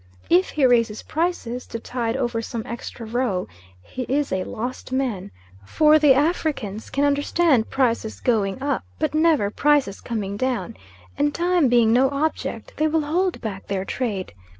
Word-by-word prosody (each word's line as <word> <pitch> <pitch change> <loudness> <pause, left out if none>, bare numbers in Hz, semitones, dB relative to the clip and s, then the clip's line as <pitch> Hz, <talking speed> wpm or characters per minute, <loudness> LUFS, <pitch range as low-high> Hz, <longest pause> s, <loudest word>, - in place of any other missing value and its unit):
If 180 +2 +4
he 290 -3 +2
raises 230 -3 +2
prices, 310 -7 -2
to - - -5
tide 235 0 -2
over 240 -3 -1
some 230 0 -5
extra 235 0 -7
row, 225 -5 -1 0.4
he 255 - -7
is 285 +2 0
a 185 0 0
lost 245 +3 -5
man; 255 - -2 0.3
for 305 - +4
the 290 -3 +6
Africans 280 - -1
can 280 +1 +1
understand 285 -2 +2
prices 235 -4 0
going 210 -3 0
up, 285 - -1
but - - -1
never 310 -10 +3
prices 285 -7 +2
coming 205 -4 -4
down; 245 -6 -2 0.4
and 290 0 +1
time 350 -3 +2
being 235 -2 +4
no 260 +2 +4
object, 290 +3 -3
they 310 - +2
will 315 +1 +1
hold 350 +5 -1
back 200 -4 -6
their 195 -1 -2
trade. 205 - -3
250 Hz, 160 wpm, -23 LUFS, 220-295 Hz, 0.4 s, the